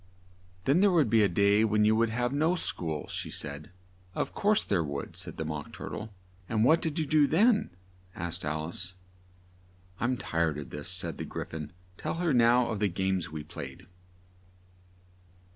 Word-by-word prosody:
"Then 140 +6 +4
there 200 +1 +6
would 160 - +3
be 115 -1 +5
a 100 - +4
day 100 +4 +4
when 105 -1 +3
you 110 +1 +4
would 115 0 +3
have 120 +3 -1
no 160 +5 +2
school," 80 - -2
she - - -4
said. 70 +1 -4 0.5
"Of - - -2
course 210 0 +2
there 90 -5 +1
would," 70 -2 -5
said - - -6
the 80 - -3
Mock 75 -1 -5
Tur - - -7
tle. 110 +1 -6 0.4
"What 120 +9 +4
did 160 0 -2
you 160 - +1
do 150 0 +4
then?" 215 - +3 0.5
asked 85 +1 -5
Al 75 +1 -2
ice. 90 +1 -6 1.0
"I'm 125 +2 +1
tired 85 - 0
of 70 -3 -7
this," - - -5
said - - -1
the - - -3
Gry - - -5
phon: 75 -2 -6 0.3
"tell - - -2
her 170 -2 +1
now 120 0 +5
of 110 -3 -2
the 105 -1 +2
games 95 -1 -1
we 75 -1 -6
played." 75 - -8
105 Hz, 180 wpm, -29 LUFS, -, 1.0 s, there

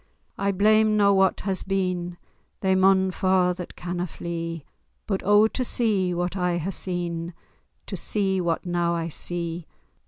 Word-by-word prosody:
I 200 0 0
blame 215 +2 +3
na 200 -1 +5
what 190 -1 +2
has 190 -2 -1
been— 180 -2 -2 0.4
They 190 -1 +2
maun 190 0 +4
fa' 185 -1 +2
that 180 -1 -8
canna 175 +1 -4
flee— 165 -2 -5 0.4
But 195 -3 -2
oh, 205 +2 +5
to 255 - -2
see 210 -7 +1
what 175 +1 -2
I 180 -2 0
hae 175 +3 -3
seen, 175 -2 -3 0.5
To - - -5
see 195 -3 0
what 170 0 -1
now 175 -1 0
I 165 0 -2
see! 170 +1 -3
180 Hz, 155 wpm, -25 LUFS, 175-195 Hz, 0.5 s, na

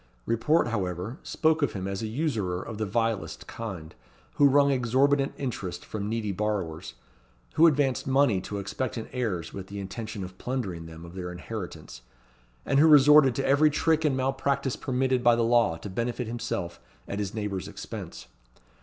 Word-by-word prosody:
Report, 120 +6 +2
however, 95 - -3
spoke 160 0 +1
of 140 -6 +1
him 95 -1 -4
as 100 +1 -3
a 110 - -2
usurer 110 - -1
of 110 +2 -7
the 110 - -1
vilest 115 0 -1
kind, 95 -9 -7 0.4
who 145 - +7
wrung 140 +1 +4
exorbitant 135 +2 +2
interest 115 -9 -4
from 105 -1 -4
needy 110 -2 -1
borrowers, 95 -5 -3 0.6
who 165 - +6
advanced 140 -5 +1
money 135 -8 +3
to 100 - -5
expectant 115 +3 -4
heirs, 100 -10 -2
with 95 -1 -7
the 100 +1 -7
intention 100 +1 -5
of 90 0 -9
plundering 100 -11 -3
them 80 +1 -10
of 85 - -11
their 90 -1 -5
inheritance, 65 -6 -7 0.6
and 135 - +2
who 155 - +7
resorted 150 -3 +7
to 135 - -1
every 145 +3 +5
trick 160 +1 +1
and 145 -4 +2
malpractice 135 0 0
permitted 130 -1 0
by 120 -1 +6
the 115 - +1
law 115 -8 +3
to 100 - -8
benefit 120 +5 -2
himself 115 -6 -4 0.3
at 100 - -4
his 100 0 -3
neighbour's 105 -3 -3
expense. - - -8
115 Hz, 170 wpm, -27 LUFS, 95-135 Hz, 0.6 s, who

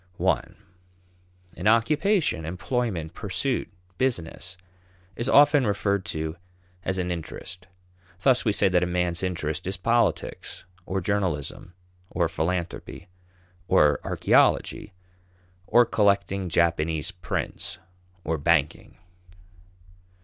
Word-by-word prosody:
(I) - - +2 1.1
An 90 - -2
occupation, 145 - +2
employment, 90 0 -2
pursuit, 115 +6 -2 0.3
business 90 -6 -2 0.6
is 120 +3 -2
often 145 -3 +6
referred 100 -1 0
to 80 +1 -4 0.5
as 95 - -1
an 90 -1 -1
interest. 85 +2 -7 0.5
Thus 130 0 +4
we 110 - +2
say 100 - +3
that 90 -2 +3
a 90 - +1
man's 90 -1 -1
interest 80 -4 -3
is 95 - -2
politics, 115 +2 -1 0.2
or 95 0 -1
journalism, 90 -2 -2 0.3
or 85 -2 +1
philanthropy, 85 +2 -4 0.6
or - - +4
archaeology, - - +2 0.8
or 120 0 +5
collecting 100 -3 +1
Japanese 80 -1 +1
prints, 90 -4 -4 0.5
or 80 -1 -1
banking. 75 -1 +1
90 Hz, 100 wpm, -25 LUFS, 85-105 Hz, 1.1 s, often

